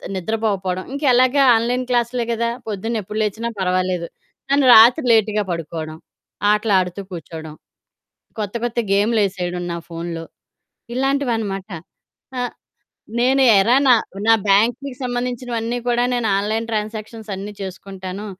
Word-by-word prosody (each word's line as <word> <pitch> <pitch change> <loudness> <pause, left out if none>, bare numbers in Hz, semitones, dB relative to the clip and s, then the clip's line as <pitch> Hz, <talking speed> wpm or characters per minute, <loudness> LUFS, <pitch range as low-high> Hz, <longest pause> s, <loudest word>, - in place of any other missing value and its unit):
నిద్రపోకపోవడం 190 -2 -2
ఇంకా 285 +2 -3
ఎలాగా 255 +3 +4
online 245 +3 0
class 240 -1 +1
లే 240 - +1
కదా! 235 +1 0 0.2
పొద్దున్న 220 +2 -3
ఎప్పుడు 210 +3 -5
లేచినా 220 +3 -2
పర్వాలేదు 185 -2 0 0.4
కానీ 280 -1 +4
రాత్రి 240 +6 +7
లేట్‌గా 215 -1 +2
పడుకోడం, 160 -1 -5 0.5
ఆటలు 210 0 +1
ఆడుతూ 180 +2 -3
కూర్చోడం, 160 -2 -8 0.9
కొత్త 205 +1 -4
కొత్త 240 0 -2
గేమ్లేసేయడం 200 -4 0
నా - - -4
ఫోనులో 165 0 -5 0.7
ఇలాంటివనమాట. 235 -7 -1 0.7
ఆహ్, 245 - -2 0.7
నేను 260 +3 +3 0.2
ఎరా 230 +6 +4
నా 250 - +8 0.3
నా 225 - +7 0.2
బ్యాంక్‌కి 240 +7 +2
సంబంధించినవన్నీ 245 -1 -3
కూడా 240 0 +2
నేను 240 -2 0
ఆన్‌లైన్ 220 +3 -1
ట్రాన్సాక్షన్స్ 215 0 -5
అన్నీ 200 +2 -7
చేసుకుంటాను 190 +1 -7
215 Hz, 120 wpm, -20 LUFS, 190-240 Hz, 0.9 s, నా